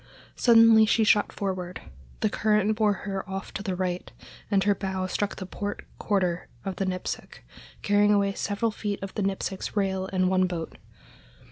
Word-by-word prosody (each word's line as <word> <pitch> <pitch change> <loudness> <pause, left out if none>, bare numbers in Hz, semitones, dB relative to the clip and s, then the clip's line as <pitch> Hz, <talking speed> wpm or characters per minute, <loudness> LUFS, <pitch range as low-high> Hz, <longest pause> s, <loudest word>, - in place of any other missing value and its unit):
Suddenly 225 -2 +6
she 225 - +3
shot 210 -1 +3
forward, 185 -2 -4 0.4
the 215 - +2
current 215 0 +2
bore 215 -1 +3
her 195 -1 -4
off 195 0 -5
to - - -4
the 195 -3 -2
right, 180 -1 -3 0.4
and 195 -2 +3
her 205 - +3
bow 190 -1 -3
struck 200 +2 -2
the 190 - -6
port 205 +2 -5
quarter 180 -4 0 0.2
of 195 -2 -4
the 195 - -1
Nipsic, 185 -1 -5 0.4
carrying 205 0 +4
away 200 -1 +2
several 205 +3 -1
feet 205 -1 -3
of 195 - -6
the 210 - -3
Nipsic's 195 +1 -3
rail 190 -1 0
and 185 -1 +2
one 185 0 +3
boat. 170 -3 -5
195 Hz, 170 wpm, -26 LUFS, 185-210 Hz, 0.4 s, Suddenly